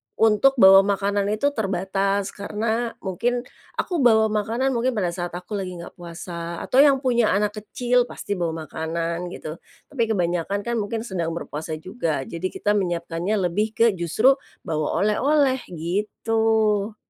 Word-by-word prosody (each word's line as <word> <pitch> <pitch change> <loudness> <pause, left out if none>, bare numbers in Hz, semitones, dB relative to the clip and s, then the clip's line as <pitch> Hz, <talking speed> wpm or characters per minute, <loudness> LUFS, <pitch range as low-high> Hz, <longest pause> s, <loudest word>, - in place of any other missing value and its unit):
untuk 225 +5 +4
bawa 195 -5 +8
makanan 200 0 +1
itu 215 +8 +1
terbatas. 195 -2 -1
Karena, 220 +3 -2
mungkin 240 +6 -1 0.3
aku 350 -4 -1
bawa 220 -4 +4
makanan 225 +5 0
mungkin 250 0 0
pada 185 -5 0
saat 175 0 -5
aku 190 +4 -5
lagi 185 -2 -5
nggak 170 0 -9
puasa, 170 0 -6
atau 260 - +2
yang 280 -1 +7
punya 240 -5 +3
anak 210 +1 +1
kecil, 245 +3 +1
pasti - - -8
bawa 165 -2 -2
makanan, 165 +2 -3
gitu. 165 -1 -7 0.3
Tapi 240 -5 0
kebanyakan 180 -1 -1
kan, 235 0 -1
mungkin 220 +2 -3
sedang 170 -7 -3
berpuasa 160 -1 -5
juga. 165 - -3
Jadi 170 +6 -4
kita 205 - -1
menyiapkannya 175 0 -1 0.2
lebih 215 +4 -1
ke, 230 - +4
justru, 195 - +3 0.3
bawa 155 +3 -1
oleh-oleh, 265 +5 +2
gitu. 210 +4 0
200 Hz, 145 wpm, -23 LUFS, 175-225 Hz, 0.3 s, bawa